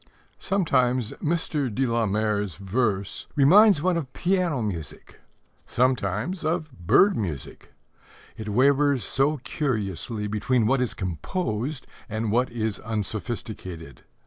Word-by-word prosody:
Sometimes 130 - +1
Mr. 150 -5 -1
de 130 +6 0
la 115 -2 +1
Mare's 105 -2 0
verse 100 0 -1
reminds 180 +4 +6
one 180 -1 +2
of 140 -6 -4
piano 180 -5 0
music, 85 -8 -6 0.5
sometimes 125 - 0
of 160 -1 -1
bird 125 - +3
music: 80 - -5 0.6
it 110 -1 -6
wavers 140 +2 +3
so 135 +8 +2
curiously 110 - -2
between 110 +3 +1
what 130 +3 +2
is 125 - -1
composed 115 - -3 0.2
and 110 0 -2
what 125 +3 +2
is 110 -3 -3
unsophisticated. 105 - -5
120 Hz, 115 wpm, -25 LUFS, 105-145 Hz, 0.6 s, reminds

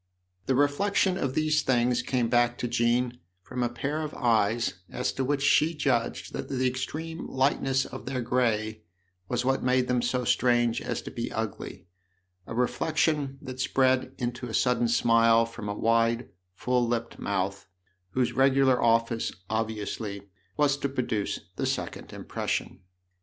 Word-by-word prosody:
The 130 - +2
reflection 180 +7 +2
of 135 -8 -2
these 155 -1 +2
things 120 -2 +2
came 125 -1 0
back 120 0 +2
to 125 - -2
Jean 120 +1 +1 0.2
from 125 - -5
a 120 - +1
pair 140 +6 -3
of 155 -1 -5
eyes 115 -4 +1
as 125 +1 -2
to 135 - -1
which 140 +1 0
she 155 +3 +4
judged 125 -6 -1
that - - -5
the 130 -1 0
extreme 155 +6 -3
lightness 135 0 +1
of - - -9
their 130 -1 -2
grey 110 -3 0 0.5
was 125 0 -1
what 135 0 +1
made 125 0 +2
them 125 -1 +1
so 125 +1 -1
strange 120 -1 +2
as - - -3
to - - -7
be - - -4
ugly - - -5 0.6
a - - -6
reflection 145 +2 0
that 130 0 -7
spread 130 0 +2
into 120 0 -3
a 110 - -4
sudden 125 -2 +2
smile 115 0 +4
from 115 -2 -7
a 100 - -2
wide, 115 +2 +1 0.3
full 125 +3 +1
lipped 115 0 -3
mouth, 100 0 -2 0.5
whose 130 -2 +1
regular 135 -1 +4
office, 115 0 +2 0.2
obviously, 105 -2 -3 0.3
was 145 -2 +3
to 140 - -2
produce 120 -6 -2 0.2
the - - -1
second - - -4
impression. - - -3
125 Hz, 155 wpm, -27 LUFS, 115-135 Hz, 0.6 s, she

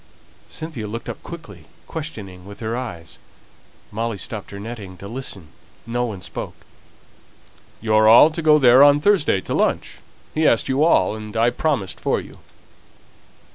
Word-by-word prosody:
Cynthia 155 -9 -6
looked 115 +3 -6
up - - -7
quickly, 170 -1 -10 0.2
questioning 105 - -7
with 100 +1 -11
her 115 0 -3
eyes; 90 -11 -7 0.7
Molly 115 0 -3
stopped 105 +1 -6
her 100 - -8
netting 105 -4 -8
to 100 - -9
listen; 105 -8 -7 0.4
no 120 +1 -1
one 105 -6 -6
spoke. - - -6 1.3
"You're 110 -1 +3
all 120 +8 +8
to 165 - -4
go 155 -1 +6
there 130 -2 +6
on 145 0 +7
Thursday 155 - +2
to - - -5
lunch; - - 0 0.3
he 155 0 +2
asked 115 - +2
you 135 +3 +2
all, 160 -9 +3
and 110 0 -7
I 115 +2 +3
promised 120 - -2
for - - 0
you." - - -12
115 Hz, 155 wpm, -21 LUFS, 100-145 Hz, 1.3 s, all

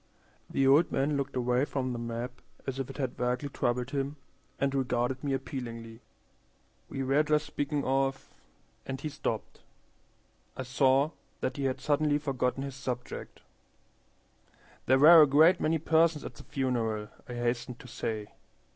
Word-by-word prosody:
The 135 - +1
old 145 +5 +5
man 145 +2 +1
looked 140 -1 -2
away 125 +1 +2
from 130 -3 -2
the 120 - -4
map 120 +2 -5 0.2
as 135 0 -3
if 135 0 -3
it 135 - -8
had 130 -3 -2
vaguely 125 +3 -1
troubled 125 0 -1
him, 140 +1 -2 0.4
and 140 0 +1
regarded 125 -1 0
me 140 -2 0
appealingly. 115 -4 -5 0.9
"We 135 -1 -3
were 135 +3 +3
just 150 0 +1
speaking 145 0 -2
of" 135 0 0 0.5
and 135 0 -5
he 155 - -4
stopped. - - -4 1.0
I 130 - -3
saw 135 +3 +3 0.3
that 130 - -2
he 140 - -1
had 130 -1 0
suddenly 150 0 +2
forgotten 135 -2 -1
his 140 -1 -5
subject. 125 -2 -6 1.5
"There 130 - +5
were 160 +4 +9
a 150 - +7
great 160 +6 +6
many 160 +1 +2
persons 160 0 +2
at - - -6
the - - -13
funeral," 115 -5 -1 0.2
I 120 - -5
hastened 120 +1 -2
to - - -12
say. 110 -3 -4
135 Hz, 155 wpm, -30 LUFS, 125-145 Hz, 1.5 s, were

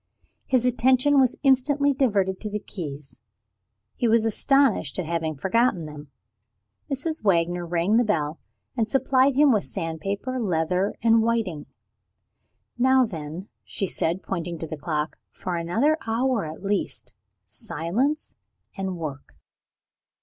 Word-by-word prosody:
His 255 -2 +2
attention 260 +3 +4
was 260 -2 +3
instantly 280 +1 +3
diverted 200 -8 +1
to 215 - -3
the 210 - -2
keys; 145 - -8 0.7
he 240 - 0
was 225 0 +3
astonished 245 - +2
at 185 - -2
having 160 -1 -2
forgotten 190 - +1
them. 150 -1 -10 0.8
Mrs. 290 +1 -2
Wagner 175 -2 +1
rang 175 +6 +2
the 240 - +4
bell, 160 -7 -1 0.4
and 225 -3 0
supplied 265 +1 +3
him 290 0 +5
with 210 -4 +2
sandpaper, 195 +10 -4
leather, 180 -1 0
and 225 -1 +5
whiting. 220 -9 -1 1.1
"Now 260 +1 +5
then," 165 0 -7 0.2
she 195 - -3
said, 175 0 -1
pointing 175 -2 -4
to 165 - -5
the 155 - -5
clock, 150 0 -3
"for 180 - -5
another 225 - +1
hour 230 -2 +1
at 155 +4 -8
least 185 - -2 0.3
silence 170 - -2 0.4
and 190 -2 -3
work!" 140 - -7
195 Hz, 130 wpm, -25 LUFS, 165-250 Hz, 1.1 s, him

